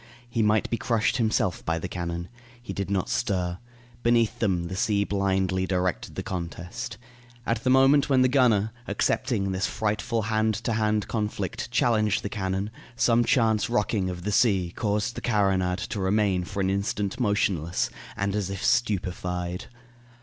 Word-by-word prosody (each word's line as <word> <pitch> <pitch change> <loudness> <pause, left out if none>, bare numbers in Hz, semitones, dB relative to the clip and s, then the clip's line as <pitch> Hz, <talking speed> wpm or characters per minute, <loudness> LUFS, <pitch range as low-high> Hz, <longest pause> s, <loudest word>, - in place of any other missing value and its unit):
He 120 -1 -1
might 105 0 +3
be 115 - +1
crushed 115 +1 +1
himself 110 -6 0
by 80 0 0
the 85 - -4
cannon. 85 -1 -4 0.3
He 120 - -7
did 100 -2 -3
not 95 -2 0
stir. 90 -3 -1 0.4
Beneath 120 -2 +2
them 95 -6 +1
the 85 +2 -5
sea 100 +1 +1
blindly 95 -2 0
directed 90 -1 -1
the - - -3
contest. 90 +7 -5 0.5
At 115 -1 -1
the 130 - +2
moment 135 +2 +5
when 130 -2 +5
the - - +5
gunner, 120 -5 +3 0.2
accepting 100 -7 0
this 95 +2 0
frightful 110 +2 -1
hand 110 0 +1
to 115 +2 -2
hand 105 -2 +1
conflict, 105 -4 -3
challenged 110 -4 +2
the 100 - -3
cannon, 95 0 -2 0.2
some 120 0 +3
chance 115 -3 +2
rocking 105 -4 0
of 90 -1 -6
the 105 - -1
sea 95 -6 +2
caused 105 +1 0
the - - -6
carronade 95 -5 +1
to 105 - -3
remain 95 -2 +1
for 100 +1 -4
an 95 0 +1
instant 100 +2 -2
motionless 100 -7 0 0.3
and 100 0 -1
as 100 -3 -1
if 100 0 -4
stupefied. 90 -6 -1
100 Hz, 165 wpm, -26 LUFS, 95-115 Hz, 0.5 s, moment